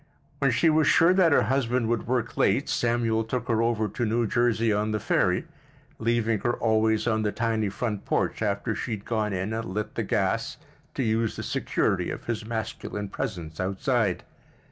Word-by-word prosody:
When 140 - +3
she 135 +7 +2
was 155 0 +3
sure 170 +3 +5
that 185 -3 +4
her - - +5
husband 125 -3 0
would 115 -1 -1
work 125 -2 -1
late - - +2
Samuel 115 -2 +1
took 115 +2 -3
her 115 -1 +2
over 115 -2 +1
to 120 - -4
New 115 +1 +1
Jersey 115 -1 +2
on 105 +1 0
the 110 - 0
ferry, - - +1 0.5
leaving 115 -1 +1
her 120 - 0
always 110 -1 +1
on 110 -2 +1
the 105 -1 0
tiny 110 -2 0
front 105 0 -3
porch, - - -1
after 105 +2 -1
she 125 - -4
had 105 -1 -6
gone 110 -2 -1
in 95 +3 -2
and 115 0 -2
lit 105 +3 -4
the - - -2
gas - - -1 0.4
to 130 - 0
use 115 -1 0
the - - -5
security - - 0
of - - -6
his 115 -2 -2
masculine 110 -2 -4
presence 90 -11 -5
outside. 100 +2 0
115 Hz, 190 wpm, -26 LUFS, 105-120 Hz, 0.5 s, sure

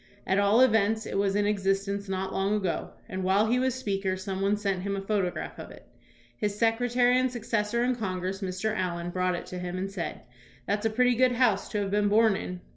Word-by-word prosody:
At 190 +1 +2
all 205 +4 +4
events, 220 -3 +3
it - - -2
was 200 -1 +1
in 205 0 +2
existence 200 0 -1
not 190 0 -2
long 195 +2 +1
ago, 190 -5 -2 0.2
and 185 0 -4
while 195 +3 +3
he 240 +3 +2
was 260 -1 +1
Speaker 195 -6 -2
some 190 0 -4
one 200 +1 +2
sent 195 -3 -1
him 200 +1 -2
a 195 - -3
photo 195 -2 0
graph - - -7
of - - -8
it. - - -14 0.5
His 205 +5 -2
secretary 245 +2 +3
and 255 0 +1
successor 230 -1 -1
in 250 +1 +2
Congress, 190 -3 -3
Mr. 190 +3 -2
Allen, 175 -2 -2
brought 185 0 0
it - - -6
to 180 - -7
him 180 0 -4
and 195 +1 -3
said, 190 -4 -5 0.2
" 125 +1 -26
That's 205 +2 0
a - - 0
pretty 250 +3 +3
good 250 +1 +3
house 235 -5 +2
to 210 - -1
have 195 - -4
been 205 0 +2
born 220 0 +4
in." 180 -1 -5
200 Hz, 230 wpm, -28 LUFS, 190-225 Hz, 0.5 s, all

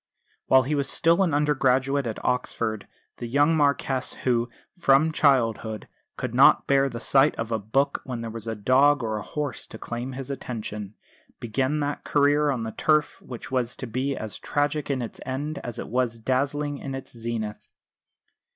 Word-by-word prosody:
While 130 0 +6
he 140 +4 -2
was 140 -2 0
still 170 +3 +3
an 185 -4 +2
undergraduate 140 -2 +2
at 110 - -4
Oxford 110 -4 -1 0.3
the 120 - -5
young 145 +6 +3
Marquess 140 -3 +1
who, 120 -1 +1 0.3
from 145 +1 +4
childhood, 115 -8 +1 0.3
could - - -4
not - - +6
bear 140 0 +3
the 120 - -6
sight 135 +4 +4
of 115 0 -4
a 110 - 0
book 125 +8 0
when 125 -3 -5
there 115 -1 -5
was 115 0 -7
a 110 - -2
dog 130 +6 +4
or 110 -1 -1
a - - -4
horse 145 +2 -4
to - - -10
claim 120 +2 -5
his 135 +1 -6
attention, 105 -6 -6 0.4
began 130 +6 -1
that 145 0 -3
career 145 +1 +3
on 125 -5 -1
the 110 - -4
turf 150 +5 +1
which 125 0 -9
was 125 -2 -1
to - - -6
be 130 +4 -2
as 110 -1 -6
tragic 145 0 -1
in 130 -3 -1
its 115 - -8
end 145 +4 -4
as 120 - -7
it - - -5
was 120 -1 0
dazzling 140 +4 -1
in 135 -1 -5
its 135 -2 -9
zenith. 115 -2 -5
130 Hz, 180 wpm, -25 LUFS, 115-145 Hz, 0.4 s, While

